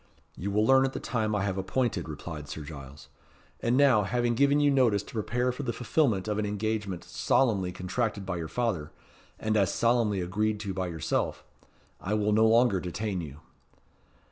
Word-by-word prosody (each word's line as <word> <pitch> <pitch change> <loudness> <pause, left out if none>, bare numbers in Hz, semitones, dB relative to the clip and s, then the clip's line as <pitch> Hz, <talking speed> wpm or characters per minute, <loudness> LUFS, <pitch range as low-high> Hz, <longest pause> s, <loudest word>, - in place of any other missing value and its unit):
"You 100 - -4
will 105 +2 +2
learn 135 +2 +5
at 135 0 -1
the - - -4
time 110 -3 -1
I 100 - 0
have 95 -1 -1
appointed," 95 -3 -1
replied 75 -1 -7
Sir 80 - -6
Giles. 70 -1 -10 0.5
"And 120 +2 +1
now, 135 -6 +5
having 120 +4 0
given 140 +4 +3
you 145 -1 +4
notice 120 -7 +3
to - - -14
prepare 125 +3 0
for 125 - -6
the 130 -4 -2
fulfilment 115 -4 +1
of 105 0 -1
an 105 - 0
engagement 105 -3 -2
solemnly 100 -8 +1
contracted 100 +3 -2
by 90 -2 -3
your 80 -2 -4
father, 100 -9 -2 0.5
and 110 0 0
as 100 -4 +3
solemnly 115 -4 +2
agreed 105 +4 -1
to 100 -3 -4
by 95 -1 -2
yourself, 80 -2 -2 0.6
I 105 +3 -2
will 105 0 +1
no 110 +1 +5
longer 115 -3 +4
detain 95 +2 -3
you." 75 -1 -9
105 Hz, 185 wpm, -28 LUFS, 95-120 Hz, 0.6 s, learn